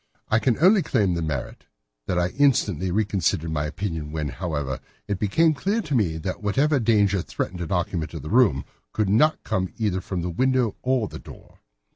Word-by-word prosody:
I 110 - +3
can 115 +1 +1
only 190 +6 +5
claim 100 - +1
the 85 - -2
merit 75 -6 -4 0.4
that 90 - 0
I 90 0 +1
instantly 105 - +2
reconsidered 95 -5 0
my 75 -1 -1
position 80 -4 -4
when, 75 -2 -3
however, 75 -3 -3 0.3
it 100 -2 -2
became 155 +11 +3
clear 195 +10 -1
to 150 - -4
me 95 -11 +1
that 90 +5 -4
whatever 135 +8 +2
danger 105 -4 +3
threatened 90 0 -4
an 85 - -5
occupant 90 -3 -2
of 80 - -6
the 75 - -6
room 110 - +4 0.3
could 105 -3 0
not 150 +10 +3
come 95 -1 -1
either 100 -5 0
from 90 -2 -4
the 90 - -2
window 130 +2 +1
or 125 -4 +1
the - - -9
door. - - -14
100 Hz, 190 wpm, -24 LUFS, 85-120 Hz, 0.4 s, only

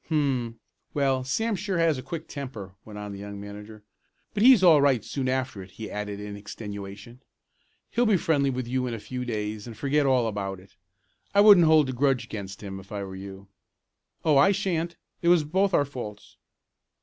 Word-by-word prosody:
"Hum! 130 -7 0 0.4
Well, 135 -2 +1
Sam 220 - 0
sure 190 -1 -2
has 165 -5 +2
a - - -5
quick 155 +5 -6
temper," 120 - -7
went 105 -1 -10
on 105 0 -6
the 100 - -8
young 100 0 -7
manager. 105 +1 -10 0.5
"But 205 - -1
he's 245 -4 +7
all 160 -5 +7
right 135 -6 +3
soon 130 -2 -2
after 130 -6 -2
it," 95 - -11
he 110 - -7
added 105 -1 -4
in 105 0 -6
extenuation. 100 +2 -8 0.7
"He'll 240 0 +2
be 210 -3 +4
friendly 145 -5 +1
with 130 -2 -3
you 125 +1 -1
in 120 - -3
a - - -7
few 125 +4 -5
days 105 -2 -4
and 115 -3 -9
forget 140 +3 +1
all 130 -3 +3
about 100 -3 -3
it. 95 - -20 0.6
I 200 - +7
wouldn't 200 -6 +8
hold 155 -3 +5
a - - -2
grudge 135 0 +1
against 100 -1 -7
him, 95 -1 -6
if 95 - -15
I 100 -1 -3
were 95 -1 -7
you." 95 0 -9 0.8
"Oh, 155 -3 +5
I 145 +8 +6
shan't. 170 -3 -1 0.3
It 170 - -1
was 175 -2 +5
both 190 +6 +1
our 145 -5 +3
faults." 115 -7 -9
125 Hz, 200 wpm, -26 LUFS, 105-155 Hz, 0.8 s, wouldn't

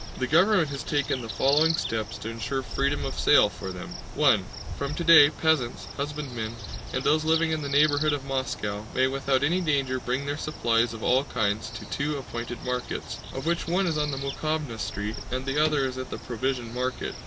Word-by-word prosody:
The 130 - 0
government 170 - +4
has 140 -1 -4
taken 140 -3 -1
the 115 - -7
following 145 - +3
steps 115 -7 -2
to 110 - -6
ensure 120 +4 -3
freedom 140 +2 -1
of 135 - -4
sale 140 -8 +6
for 95 -2 -7
them: 90 -1 -7 0.3
(1) 130 -10 +4 0.3
From 140 +1 -3
today, 165 -4 +8
peasants, 155 -6 0
husbandmen, 140 -6 -4 0.4
and 130 - -2
those 155 +1 +3
living 160 +1 +2
in 155 -1 -1
the 140 - -4
neighborhood 145 +1 +3
of 145 -2 -2
Moscow 110 -6 -3
may 130 - +4
without 135 0 0
any 175 +6 +2
danger 135 -5 0
bring 130 +3 -2
their 145 +1 -3
supplies 115 -6 +1
of 110 - -8
all 130 +2 +3
kinds 105 -3 -1
to - - -8
two 145 +1 -2
appointed 120 -2 -6
markets, 125 -1 -4
of 135 +2 -6
which 170 0 0
one 185 +3 +1
is 160 -3 0
on 150 0 0
the 135 - -3
Mokhováya 140 -2 -3
Street 105 +2 -4
and 130 +1 -3
the 140 +3 +2
other 150 -3 +2
at 130 0 -4
the - - -5
Provision 125 -1 -3
Market. 125 +1 -2
135 Hz, 195 wpm, -26 LUFS, 120-150 Hz, 0.4 s, today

